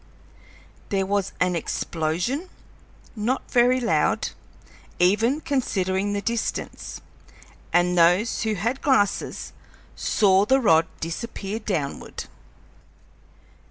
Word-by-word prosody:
There 195 -1 +1
was 200 0 0
an 180 -1 +2
explosion 170 - -2 0.7
not 235 +5 -2
very 250 +1 +4
loud, 240 - +1 0.7
even 220 - +3
considering 200 -8 0
the 200 0 -2
distance 230 -1 -3 0.7
and 175 0 +3
those 180 +6 +3
who 220 -1 0
had 230 +8 -2
glasses 260 -8 +1 0.4
saw 195 -1 +3
the 265 +3 +4
rod 165 -9 +4
disappear 200 +4 -4
downward. 175 -10 -3
205 Hz, 90 wpm, -24 LUFS, 180-235 Hz, 0.7 s, very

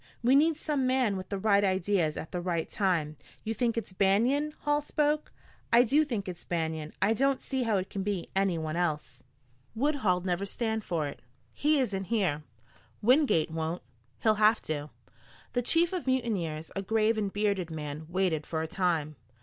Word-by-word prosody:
We 250 +3 +5
need 310 +2 +4
some 290 -5 -1
man 255 -5 +2
with 185 -1 -6
the 200 - -2
right 200 0 +3
ideas 185 -4 +1
at - - -6
the 180 - -3
right 170 -2 -1
time." 165 -7 0 0.3
"You 225 - -2
think 235 0 0
it's 205 -4 -4
Banion?" 240 +11 +2
Hall 295 0 +1
spoke. 300 0 0 0.4
"I 235 +1 +7
do 280 +6 +3
think 230 -10 -3
it's 180 -2 -7
Banion. 160 -2 -3
I 215 - +4
don't 275 +3 +2
see 265 -2 -3
how 225 -4 +1
it 185 0 -2
can 195 - -3
be 195 -3 -2
anyone 170 -5 0
else." 165 -4 -2 0.5
"Woodhull'd 220 -9 +1
never 180 +1 0
stand 220 +2 -2
for 165 -6 -1
it." 145 - -6 0.3
"He 300 +1 +2
isn't 200 -7 -1
here." 185 -9 0 0.6
"Wingate 245 - +4
won't." 160 +2 -3 0.4
"He'll 215 -1 +3
have 215 +2 +5
to." 150 -1 -4 0.6
The 245 - +1
chief 330 +8 +3
of 360 -6 -3
mutineers, 190 -12 -1
a 195 - -1
grave 220 +2 +2
and 205 -2 -1
bearded 200 -4 0
man, 155 -1 -6
waited 175 -4 0
for 160 -1 -2
a - - -3
time. 160 -4 -1
200 Hz, 180 wpm, -29 LUFS, 170-245 Hz, 0.6 s, I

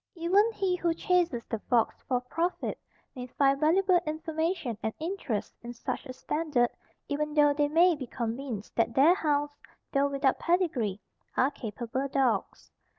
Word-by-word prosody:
Even 380 +7 +3
he 385 -4 0
who 340 -2 0
chases 345 -9 +1
the 225 - -4
fox 235 -2 +2
for 250 -2 +1
profit 330 +8 -2 0.3
may 250 -2 -7
find 275 +2 +2
valuable 360 +4 +4
information 320 -3 -2
and 220 - -3
interest 320 - -3
in 240 0 -7
such 240 +4 -5
a 255 - -6
standard, 265 -2 0 0.4
even 300 +1 -2
though 295 -1 +5
they 290 0 +1
may 335 +3 +4
be 270 -4 -7
convinced 235 -2 -5
that 230 0 +1
their 295 +6 +6
hounds, 295 -4 0 0.4
though 280 0 +2
without 275 -1 +1
pedigree, 295 - 0 0.4
are 265 +3 +3
capable 240 +3 -4
dogs. 260 -7 -1
285 Hz, 150 wpm, -29 LUFS, 245-330 Hz, 0.4 s, their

